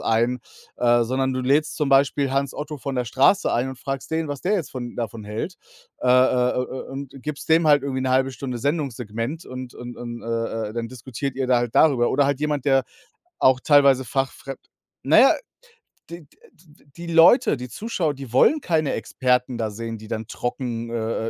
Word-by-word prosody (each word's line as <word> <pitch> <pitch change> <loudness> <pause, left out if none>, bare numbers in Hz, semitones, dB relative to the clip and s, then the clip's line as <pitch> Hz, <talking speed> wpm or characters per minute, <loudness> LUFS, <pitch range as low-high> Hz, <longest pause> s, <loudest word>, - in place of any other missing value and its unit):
ein, 120 +2 +1 0.4
äh, 120 -1 +3
sondern 130 +2 -1
du 130 - -1
lädst 145 +5 +1
zum 150 -3 0
Beispiel 135 0 +3
Hans 140 -1 0
Otto 150 +1 -5
von 135 -1 -4
der 125 - 0
Straße 135 - +3
ein 125 +3 0
und 130 -1 -8
fragst 135 +2 -5
den, 160 0 -1
was 145 -2 -5
der 195 +4 0
jetzt 175 -8 -2
von 120 -2 -6
davon 115 -2 -4
hält, 110 - -5 0.5
äh, 125 - +1
äh, 125 0 +4
äh, - - +2
äh, 130 +1 -6
und 135 0 -7
gibst 150 0 -6
dem 160 0 +4
halt 145 -2 +5
irgendwie 130 -1 -2
'ne 130 0 -1
halbe 130 +1 +2
Stunde 125 -1 -5
Sendungssegment 130 -1 -3
und 130 -1 -8
und 120 0 -8
und, 120 -1 -7
äh, 115 -2 -3
äh, - - -10
dann 115 0 -4
diskutiert 130 +2 -6
ihr 135 -1 -1
da 125 -1 +3
halt 120 -1 -3
darüber. 130 -6 +4
Oder 145 - +3
halt 140 0 -1
jemand, 150 -3 -1
der 135 -2 +3 0.6
auch 130 -1 +4
teilweise 140 -3 +5
fachfremd 135 +1 -3 0.4
na - - +5
ja, - - +7 0.8
die 170 0 -8
d, - - -28
äh, - - -20
d 155 -3 -24
die 170 - -8
Leute, 170 - +5
die 125 0 -7
Zuschauer, 175 - -2
die 135 -4 -10
wollen 300 - +5
keine 160 -4 0
Experten 125 -1 0
da 110 -2 -2
sehen, 115 +1 -6
die 110 - -12
dann 110 -1 -4
trocken, 120 -1 -4
äh, 115 -1 -2
130 Hz, 205 wpm, -23 LUFS, 120-145 Hz, 0.8 s, ja